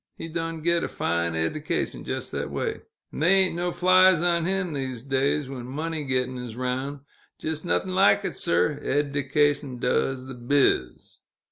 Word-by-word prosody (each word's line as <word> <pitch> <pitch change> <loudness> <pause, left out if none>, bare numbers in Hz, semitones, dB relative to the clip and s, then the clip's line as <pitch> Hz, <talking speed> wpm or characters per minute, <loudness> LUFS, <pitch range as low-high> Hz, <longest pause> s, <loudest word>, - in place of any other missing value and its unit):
He 165 - -6
done 165 -1 -4
git 170 0 +2
a - - -1
fine 85 0 -1
eddication 115 - -2
jes' - - -4
thet - - -3
way, 440 -2 -3 0.3
'n' - - -6
they 165 +5 +4
ain't 190 -1 +3
no 175 +1 -1
flies 185 -1 +5
on 170 -1 +2
him, 185 -2 -1
these 130 -4 -4
days, 135 +1 0
when 130 -2 -7
money 155 +3 -3
gett'n' 130 -1 -1
is 120 -2 -8
'roun'. 130 +3 -3 0.4
Jes' 155 0 -3
noth'n' 185 +1 0
like 105 - +4
it, - - -3
sir 90 +12 +1
r! - - -14
Eddication 145 -1 0
does 130 +1 0
th' 125 -2 -10
biz!" 135 - +1
145 Hz, 170 wpm, -25 LUFS, 130-165 Hz, 0.4 s, flies